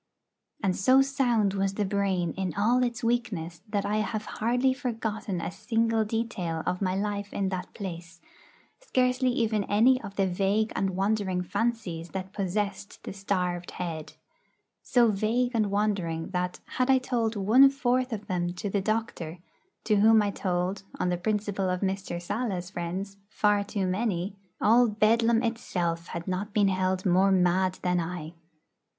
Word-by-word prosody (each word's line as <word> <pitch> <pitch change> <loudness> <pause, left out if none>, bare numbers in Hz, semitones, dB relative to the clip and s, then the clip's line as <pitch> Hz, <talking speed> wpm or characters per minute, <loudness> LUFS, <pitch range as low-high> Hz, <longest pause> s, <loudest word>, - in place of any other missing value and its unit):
And 185 -2 +2
so 260 +7 +5
sound 240 -7 +1
was 195 0 -1
the 210 - 0
brain 190 -3 0
in 185 -3 -3
all 235 +5 +3
its 240 -1 -2
weakness 210 -9 -1
that 205 -2 -1
I 210 - 0
have 215 0 -2
hardly 245 +4 +1
forgotten 220 -6 -3
a 170 - -3
single 225 +3 +1
detail 210 -7 -2
of 180 - -1
my 185 -1 0
life 205 0 -2
in 195 -1 -1
that 185 -1 -4
place, 175 -2 -7 0.6
scarcely 255 - +1
even 220 -4 +1
any 245 +5 +4
of 200 -2 -8
the 195 - +2
vague 195 +4 0
and 190 -1 0
wandering 195 -2 0
fancies 185 -6 -2
that 190 +1 -5
possessed 200 +1 -3
the - - -6
starved 180 -3 -2
head; 160 -3 -5 0.7
so 240 -3 +3
vague 225 +5 +1
and 215 -3 +1
wandering 195 -6 -1
that, 180 -1 -2
had 255 +1 -1
I 265 - +6
told 235 -3 -1
one 225 +8 +6
fourth 255 -1 0
of 210 -2 -4
them 175 -3 -1
to 195 +2 -4
the 200 - +1
doctor, 195 -6 -2 0.5
to 210 -2 +2
whom 220 +1 +6
I 205 - 0
told 185 0 -1 0.2
(on 180 - +1
the 175 - 0
principle 200 0 -1
of 180 0 -1
Mr. 190 -2 -2
Sala's 185 -1 -3
friends) 190 +3 -4
far 210 -1 +2
too 200 -1 -2
many, 190 -1 -1 0.2
all 235 +3 +5
Bedlam 225 +2 +3
itself 175 -8 -2
had 170 +1 -6
not 190 +3 -3
been 205 -2 +4
held 185 0 0
more 190 +2 +4
mad 185 0 +2
than 180 -1 +2
I. 165 -1 -5
200 Hz, 160 wpm, -27 LUFS, 185-225 Hz, 0.7 s, I